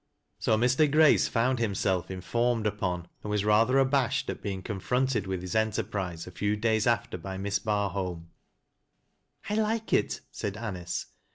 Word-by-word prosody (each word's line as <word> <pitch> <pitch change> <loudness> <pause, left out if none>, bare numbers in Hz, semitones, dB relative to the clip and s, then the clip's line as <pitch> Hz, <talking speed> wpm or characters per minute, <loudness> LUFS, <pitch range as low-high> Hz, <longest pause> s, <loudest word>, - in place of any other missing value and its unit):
' - - -50
" - - -48
So 110 - +2
Mr. 130 +6 +3
Grace 155 0 +5
found 125 +2 +1
himself 95 -5 0
informed 115 +5 0
upon, 90 -4 -2 0.2
and 105 - -4
wnf 105 -1 0
rather 115 +5 +4
abashed 135 -1 +2
at - - -8
being 95 -2 -4
confronted 115 +2 -1
with 95 -2 -2
his 90 - -5
enterprise 105 -6 -1
a 90 - -9
few 100 +3 0
days 110 0 +1
after 110 -6 0
by 95 +2 -6
Miss 100 +1 -1
Barholm. 95 -5 -2 0.6
" - - -19
I - - +1
like 220 +1 0
it," - - +1
said 100 0 -4
Anice. 95 -6 -4
105 Hz, 170 wpm, -28 LUFS, 95-120 Hz, 0.6 s, Grace